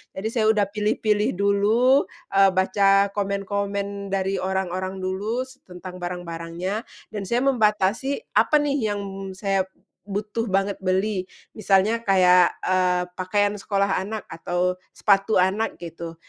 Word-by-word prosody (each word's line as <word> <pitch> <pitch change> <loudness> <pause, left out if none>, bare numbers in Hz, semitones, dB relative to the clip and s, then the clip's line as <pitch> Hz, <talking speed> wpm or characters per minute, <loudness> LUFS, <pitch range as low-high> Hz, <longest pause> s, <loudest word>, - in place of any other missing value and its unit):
Jadi 195 +3 -3
saya 225 -2 +1
udah 215 -1 +4
pilih-pilih 210 +1 0
dulu, 210 +7 +3 0.2
eee, 195 0 +5
baca 195 +1 +3
komen-komen 200 0 -3
dari 195 0 -1
orang-orang 185 0 -2
dulu 190 +2 -3 0.2
s 260 +1 -16
tentang 180 0 -9
barang-barangnya, 175 +3 -4 0.3
dan 210 -2 -4
saya 240 +4 +1
membatasi 235 - +1
apa - - +4
nih 280 -8 0
yang 205 - -4 0.4
saya 195 -1 0 0.4
butuh 210 +3 -3
banget 195 0 0
beli, 190 +1 0 0.3
misalnya 210 +1 +2
kayak, 180 -2 +5
eee, 180 -1 +2 0.2
pakaian 205 +2 +1
sekolah 200 -1 0
anak 210 +3 -5
atau 180 +2 -1 0.2
sepatu 200 +1 +2
anak 190 +4 +1
gitu. 165 -1 -8
195 Hz, 125 wpm, -23 LUFS, 185-210 Hz, 0.4 s, eee